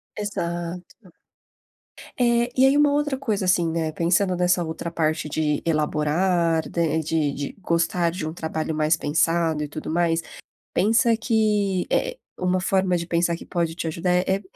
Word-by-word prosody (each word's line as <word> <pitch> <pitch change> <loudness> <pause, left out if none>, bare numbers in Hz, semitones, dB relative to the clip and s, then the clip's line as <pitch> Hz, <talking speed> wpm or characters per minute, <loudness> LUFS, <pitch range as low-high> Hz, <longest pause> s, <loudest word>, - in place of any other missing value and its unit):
Exato. 175 -1 -5 1.1
É, 240 0 +3
e 260 - +7
aí, 270 +1 +4
uma 295 0 +4
outra 290 -1 0
coisa, 220 -8 -2
assim, 180 -2 +2
né, 160 -1 -1
pensando 180 +4 +1
nessa 180 0 +2
outra 160 +1 -5
parte 155 -2 -1
de 150 -1 0
elaborar, 160 +2 +1
da 170 - -1
e 160 0 +1
de 155 -2 0
de 140 0 -5
gostar 170 0 +1
de 170 -1 -5
um 155 - -5
trabalho 160 -1 -3
mais 155 +1 +2
pensado 160 +1 +1
e - - -3
tudo 155 +1 -6
mais, 165 0 +1 0.5
pensa 225 +4 +3
que 210 -5 +1
eh, - - 0 0.2
uma 185 0 +1
forma 190 -1 +1
de 170 -1 -5
pensar 170 0 +1
que - - -10
pode 170 -2 -1
te 165 0 -4
ajudar, 170 +3 -1
é 180 0 +3
é 195 - -5
170 Hz, 170 wpm, -23 LUFS, 160-190 Hz, 1.1 s, e